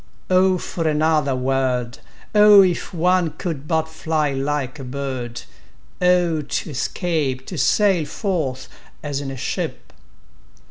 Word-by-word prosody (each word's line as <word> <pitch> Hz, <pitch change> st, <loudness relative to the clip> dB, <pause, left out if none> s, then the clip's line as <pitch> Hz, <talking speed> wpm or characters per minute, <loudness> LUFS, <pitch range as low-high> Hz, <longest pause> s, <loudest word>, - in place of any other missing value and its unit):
O 185 Hz, 0 st, +4 dB
for 165 Hz, -2 st, -3 dB
another 155 Hz, -2 st, +2 dB
world! 130 Hz, -2 st, -1 dB, 0.3 s
O 210 Hz, -1 st, +8 dB
if 180 Hz, -3 st, -1 dB
one 175 Hz, -1 st, +1 dB
could 155 Hz, -5 st, -4 dB
but 160 Hz, -1 st, 0 dB
fly 155 Hz, -2 st, -1 dB
like 140 Hz, 0 st, -2 dB
a -, -, -6 dB
bird!O 140 Hz, +6 st, -2 dB
to 150 Hz, -, -4 dB
escape—to 145 Hz, 0 st, -2 dB
sail 180 Hz, +3 st, +2 dB
forth, 155 Hz, -, -3 dB, 0.4 s
as 145 Hz, -2 st, -3 dB
in 140 Hz, -, -5 dB
a 135 Hz, -, -6 dB
ship! 125 Hz, -, -4 dB
155 Hz, 120 wpm, -21 LUFS, 135-175 Hz, 0.4 s, O